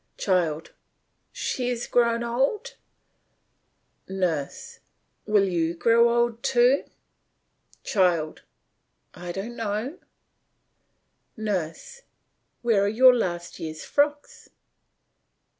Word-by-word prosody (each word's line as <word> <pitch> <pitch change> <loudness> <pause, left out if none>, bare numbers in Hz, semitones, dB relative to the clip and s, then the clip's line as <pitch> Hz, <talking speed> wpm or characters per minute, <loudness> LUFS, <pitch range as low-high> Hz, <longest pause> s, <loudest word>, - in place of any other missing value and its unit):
CHILD: 170 -5 0 0.6
She 250 -1 -2
has 240 -1 -2
grown 235 -1 +2
old. 270 - -1 1.4
NURSE: 175 -7 -3 0.5
Will 205 -2 +3
you 170 -2 0
grow 235 +6 +4
old 235 -1 +1
too? 260 0 +3 1.0
CHILD: 175 -6 +1 0.7
I 175 0 -7
don't 200 +6 -6
know. 225 - -3 1.4
NURSE: 215 - -4 0.6
Where 215 -4 +3
are - - +1
your 250 +4 +7
last 175 -7 -3
year's 155 -1 -6
frocks? 290 0 -1
220 Hz, 85 wpm, -25 LUFS, 175-240 Hz, 1.4 s, your